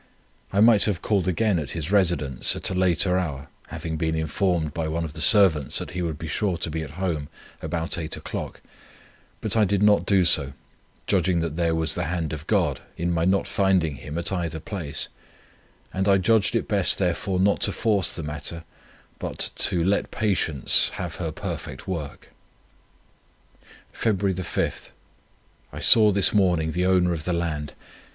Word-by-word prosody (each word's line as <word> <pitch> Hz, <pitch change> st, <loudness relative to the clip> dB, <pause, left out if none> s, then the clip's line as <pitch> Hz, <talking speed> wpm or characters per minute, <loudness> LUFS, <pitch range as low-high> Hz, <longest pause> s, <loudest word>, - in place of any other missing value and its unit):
I 100 Hz, -, +2 dB
might 110 Hz, -2 st, +6 dB
have 95 Hz, -5 st, -2 dB
called 100 Hz, -4 st, +1 dB
again 95 Hz, +1 st, +1 dB
at 75 Hz, -, -5 dB
his 80 Hz, +3 st, -4 dB
residence, 85 Hz, -10 st, +1 dB
at -, -, -2 dB
a -, -, -1 dB
later 90 Hz, 0 st, +2 dB
hour 70 Hz, -5 st, -5 dB, 0.2 s
having 80 Hz, 0 st, -5 dB
been 80 Hz, 0 st, -1 dB
informed 80 Hz, 0 st, -1 dB
by 80 Hz, -1 st, -2 dB
one 80 Hz, +1 st, -2 dB
of 75 Hz, -, -8 dB
the 80 Hz, -, -7 dB
servants 90 Hz, -9 st, +4 dB
that -, -, -5 dB
he 90 Hz, -, -4 dB
would 80 Hz, -4 st, -3 dB
be 80 Hz, -, -7 dB
sure 95 Hz, +3 st, -1 dB
to 85 Hz, -1 st, -4 dB
be 80 Hz, +1 st, -3 dB
at 75 Hz, +1 st, -9 dB
home 85 Hz, -6 st, -2 dB, 0.3 s
about 85 Hz, 0 st, -3 dB
eight 80 Hz, -2 st, -4 dB
o'clock; -, -, -6 dB, 0.8 s
but -, -, 0 dB
I 110 Hz, -, +4 dB
did 100 Hz, 0 st, +1 dB
not 105 Hz, -1 st, +4 dB
do 95 Hz, -3 st, +3 dB
so, 70 Hz, -5 st, +3 dB, 0.5 s
judging 90 Hz, -2 st, +1 dB
that 80 Hz, -2 st, -3 dB
there 85 Hz, -1 st, +1 dB
was 80 Hz, 0 st, +1 dB
the 90 Hz, -, -2 dB
hand 80 Hz, -1 st, -3 dB
of 80 Hz, +2 st, -7 dB
God 85 Hz, -11 st, +1 dB, 0.2 s
in 85 Hz, +1 st, -1 dB
my 85 Hz, 0 st, 0 dB
not 95 Hz, +2 st, +1 dB
finding 95 Hz, -7 st, +1 dB
him 75 Hz, +3 st, -7 dB
at 85 Hz, -, -2 dB
either 85 Hz, -4 st, -3 dB
place: 80 Hz, -4 st, -4 dB, 0.9 s
and 95 Hz, +1 st, -1 dB
I 100 Hz, -1 st, +5 dB
judged 110 Hz, +3 st, +2 dB
it 115 Hz, -, 0 dB
best 100 Hz, -4 st, +2 dB
therefore 90 Hz, +1 st, -1 dB
not 100 Hz, +2 st, +2 dB
to -, -, +2 dB
force 100 Hz, -6 st, 0 dB
the 85 Hz, -, -6 dB
matter, 75 Hz, +3 st, -6 dB, 0.6 s
but -, -, -2 dB
to 85 Hz, -2 st, +3 dB
'let 100 Hz, +3 st, 0 dB
patience 90 Hz, -, +1 dB
have -, -, -5 dB
her -, -, -3 dB
perfect -, -, -7 dB
work.' 80 Hz, -6 st, -6 dB, 1.6 s
"Feb. 95 Hz, -4 st, -1 dB
5. 85 Hz, -, -3 dB, 0.9 s
Saw 110 Hz, -2 st, +7 dB
this 100 Hz, -1 st, +4 dB
morning 90 Hz, -6 st, +2 dB
the 90 Hz, +3 st, 0 dB
owner 90 Hz, -2 st, +3 dB
of 75 Hz, -2 st, -6 dB
the 90 Hz, -, -1 dB
land. 80 Hz, -4 st, -3 dB
85 Hz, 175 wpm, -24 LUFS, 80-95 Hz, 1.6 s, Saw